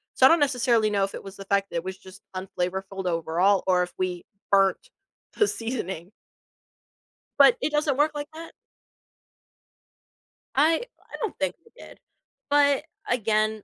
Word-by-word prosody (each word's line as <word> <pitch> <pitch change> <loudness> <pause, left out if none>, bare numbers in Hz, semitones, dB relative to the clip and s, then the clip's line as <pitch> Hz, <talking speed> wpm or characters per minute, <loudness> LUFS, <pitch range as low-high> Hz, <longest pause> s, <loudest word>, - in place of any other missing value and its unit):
So, 260 - +6
I - - +9
don't 335 +2 +5
necessarily 245 -5 +2
know 200 -1 +1
if 195 - -8
it - - -8
was 195 0 -10
the 195 - -9
fact 200 0 +1
that 170 - -2
it 165 - -2
was 190 0 -5
just 190 0 -14
unflavorful 190 +1 -4
overall 175 +4 +2
or 180 -1 +4
if 180 0 -7
we 180 -1 -2 0.3
burnt 195 - +3 0.5
the 420 - +3
seasoning. 195 - -4 1.3
But 485 - +7
it 310 - 0
doesn't 295 -2 +1
work 300 +2 +3
like 290 0 -4
that? 330 +1 -9 2.0
I 315 - +4 0.2
I - - -12
don't 445 -5 -3
think 185 -1 -1
we 460 - -23
did, - - -13 0.5
but 285 -1 +4 0.3
again, 215 -2 +1
205 Hz, 160 wpm, -25 LUFS, 190-285 Hz, 2.0 s, I